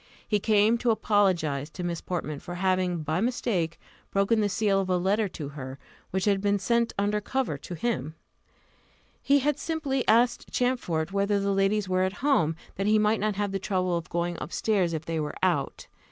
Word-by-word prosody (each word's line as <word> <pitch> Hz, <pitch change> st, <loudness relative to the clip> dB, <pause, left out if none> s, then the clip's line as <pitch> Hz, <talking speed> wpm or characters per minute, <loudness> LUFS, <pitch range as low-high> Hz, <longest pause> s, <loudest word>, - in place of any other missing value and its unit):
He 210 Hz, -, +2 dB
came 215 Hz, +3 st, +3 dB
to 240 Hz, -, 0 dB
apologize 185 Hz, -10 st, +1 dB
to 180 Hz, -, -7 dB
Miss 170 Hz, -2 st, -3 dB
Portman 155 Hz, -5 st, -4 dB
for 175 Hz, -1 st, -7 dB
having, 185 Hz, -2 st, 0 dB
by 155 Hz, +4 st, -1 dB
mistake, 215 Hz, -9 st, -1 dB, 0.3 s
broken 200 Hz, +3 st, +2 dB
the 205 Hz, -, +1 dB
seal 195 Hz, 0 st, +2 dB
of 190 Hz, -, -4 dB
a 180 Hz, -, +3 dB
letter 200 Hz, +4 st, +1 dB
to 150 Hz, -5 st, -6 dB
her, 135 Hz, -2 st, -7 dB, 0.3 s
which 190 Hz, 0 st, -1 dB
had 200 Hz, -2 st, +2 dB
been 205 Hz, 0 st, +2 dB
sent 235 Hz, +4 st, +1 dB
under 205 Hz, +1 st, +1 dB
cover 260 Hz, -, -1 dB
to 175 Hz, -, -7 dB
him. 165 Hz, -, -2 dB, 1.1 s
He 280 Hz, 0 st, +3 dB
had 295 Hz, +1 st, 0 dB
simply 290 Hz, -5 st, -1 dB
asked 240 Hz, +2 st, +3 dB
Champfort 195 Hz, -10 st, 0 dB
whether 200 Hz, +1 st, +1 dB
the 200 Hz, 0 st, 0 dB
ladies 195 Hz, +1 st, +1 dB
were 185 Hz, 0 st, +1 dB
at 185 Hz, 0 st, +1 dB
home, 165 Hz, -, +3 dB, 0.2 s
that 195 Hz, +1 st, -1 dB
he 215 Hz, +1 st, +5 dB
might 215 Hz, +1 st, +2 dB
not 210 Hz, 0 st, 0 dB
have 205 Hz, 0 st, -1 dB
the 195 Hz, -, -2 dB
trouble 185 Hz, -2 st, 0 dB
of 170 Hz, -1 st, -4 dB
going 170 Hz, 0 st, -2 dB
up -, -, -6 dB
stairs 190 Hz, -6 st, +1 dB
if 160 Hz, -1 st, -4 dB
they 165 Hz, -1 st, -2 dB
were 150 Hz, -1 st, -3 dB
out. -, -, 0 dB
195 Hz, 195 wpm, -27 LUFS, 175-215 Hz, 1.1 s, he